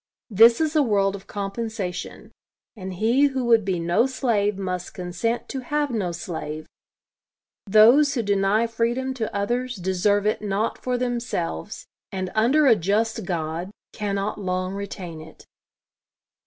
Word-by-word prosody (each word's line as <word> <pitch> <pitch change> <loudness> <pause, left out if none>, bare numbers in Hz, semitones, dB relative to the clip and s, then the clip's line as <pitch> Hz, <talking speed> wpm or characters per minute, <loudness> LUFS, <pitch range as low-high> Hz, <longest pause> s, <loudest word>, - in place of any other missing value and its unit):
This 230 +3 +7
is 315 -1 0
a 305 - +5
world 200 -6 +2
of 195 - -11
compensation; 200 -2 -5 0.4
and 190 -3 -7
he 235 +9 +3
who 265 -3 -2
would 230 -2 +4
be 190 -2 -1
no 175 +9 +2
slave 215 -6 0
must 185 -2 -4
consent 180 +6 -2
to 270 - -3
have 290 +2 -1
no 200 -7 -1
slave. 155 -3 -6 1.0
Those 235 +9 +6
who 235 - 0
deny 200 +2 +2
freedom 235 +3 -1
to 230 -4 -3
others 245 +5 -2
deserve 190 +2 +1
it 215 - 0
not 210 +1 -1
for 250 -1 -1
themselves; 235 -5 -3 0.3
and, 185 -2 -4
under 255 +8 +3
a 245 -4 +7
just 215 +4 0
God, 170 0 -3 0.2
cannot 205 0 -3
long 185 0 -2
retain 190 -5 -6
it. 160 0 -14
205 Hz, 140 wpm, -24 LUFS, 185-235 Hz, 1.0 s, This